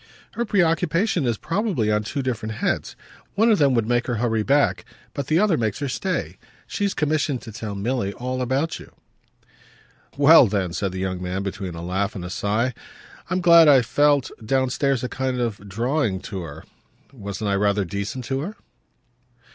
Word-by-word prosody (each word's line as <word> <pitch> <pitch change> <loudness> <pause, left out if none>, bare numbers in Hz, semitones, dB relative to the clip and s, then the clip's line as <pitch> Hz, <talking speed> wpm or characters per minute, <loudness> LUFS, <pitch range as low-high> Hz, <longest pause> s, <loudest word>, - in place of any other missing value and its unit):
"Her 235 - -2
preoccupation 175 - +1
is 115 -2 0
probably 170 - -1
on 105 0 +2
two 135 +6 -4
different 110 -4 -3
heads. - - -2 0.4
One 225 +2 +4
of 210 - +3
them 140 -3 +4
would 115 -2 +1
make 120 0 +1
her 125 - -1
hurry 115 -1 0
back, 140 +6 +2 0.3
but 140 -2 -4
the 155 - +2
other 190 -4 +3
makes 110 -3 -1
her 140 +1 -3
stay. 180 +8 -3 0.3
She's 200 -2 -2
commissioned 150 -3 0
to 110 - -9
tell 105 -1 -6
Milly 100 0 -1
all 130 +2 -4
about 135 +6 -1
you." - - -14 1.2
"Well 145 -2 +7
then," 95 -4 -1
said 100 0 -2
the 95 - -6
young 95 -1 -3
man 90 +2 -3
between 95 -3 -5
a 85 - -7
laugh 95 +3 -2
and 90 -3 -5
a 90 - -6
sigh, 110 +6 0 0.6
"I'm 185 0 0
glad 170 -2 +7
I 135 -4 +6
felt, 145 +3 +2
downstairs, 130 +2 0
a - - -1
kind 130 0 -2
of 105 -4 -3
'drawing' 115 -1 0
to 95 -4 -6
her. 80 -2 -9 0.5
Wasn't 100 -3 -5
I - - +1
rather 100 0 +1
decent 100 +7 -4
to 135 +3 -2
her?" 190 +10 -5
125 Hz, 180 wpm, -23 LUFS, 100-145 Hz, 1.2 s, Well